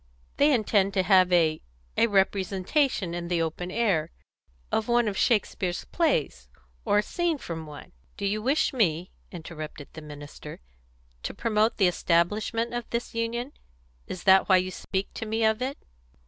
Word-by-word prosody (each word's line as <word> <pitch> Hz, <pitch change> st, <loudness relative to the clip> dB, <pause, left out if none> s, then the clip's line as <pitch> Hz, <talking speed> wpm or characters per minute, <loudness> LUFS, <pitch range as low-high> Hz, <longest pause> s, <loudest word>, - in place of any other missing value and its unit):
"They 290 Hz, +1 st, +5 dB
intend 210 Hz, -5 st, +2 dB
to 190 Hz, -, +3 dB
have 185 Hz, -1 st, +5 dB
a 160 Hz, -3 st, +3 dB, 0.3 s
a -, -, +4 dB
representation, 195 Hz, -, +1 dB
in 170 Hz, 0 st, -4 dB
the 175 Hz, -1 st, 0 dB
open 165 Hz, +2 st, -4 dB
air, 185 Hz, -8 st, +1 dB, 0.6 s
of 220 Hz, -, 0 dB
one 240 Hz, -1 st, +3 dB
of 205 Hz, -, -2 dB
Shakespeare's 190 Hz, -5 st, 0 dB
plays, 155 Hz, -, -1 dB, 0.3 s
or 210 Hz, 0 st, +2 dB
scenes 335 Hz, -, -1 dB
from 160 Hz, -2 st, -6 dB
one 150 Hz, -1 st, -11 dB
" -, -, -35 dB
"Do 200 Hz, -, -3 dB
you 210 Hz, +2 st, 0 dB
wish 275 Hz, +6 st, +1 dB
me," 180 Hz, -8 st, 0 dB, 0.2 s
interrupted 155 Hz, -4 st, -8 dB
the 160 Hz, -, -9 dB
minister, 145 Hz, -1 st, -10 dB, 0.6 s
"to -, -, -5 dB
promote 220 Hz, -1 st, +1 dB
the 195 Hz, -, +4 dB
establishment 210 Hz, +7 st, 0 dB
of 240 Hz, 0 st, -4 dB
this 235 Hz, +1 st, -3 dB
union? 235 Hz, +4 st, -3 dB, 0.5 s
Is 185 Hz, -, -6 dB
that 190 Hz, 0 st, +5 dB
why 190 Hz, -, +7 dB
you 185 Hz, 0 st, -1 dB
speak 190 Hz, +1 st, -4 dB
to 225 Hz, -, -5 dB
me 225 Hz, +1 st, -1 dB
of 220 Hz, +2 st, +2 dB
it?" 265 Hz, +2 st, -2 dB
195 Hz, 160 wpm, -27 LUFS, 175-230 Hz, 0.6 s, why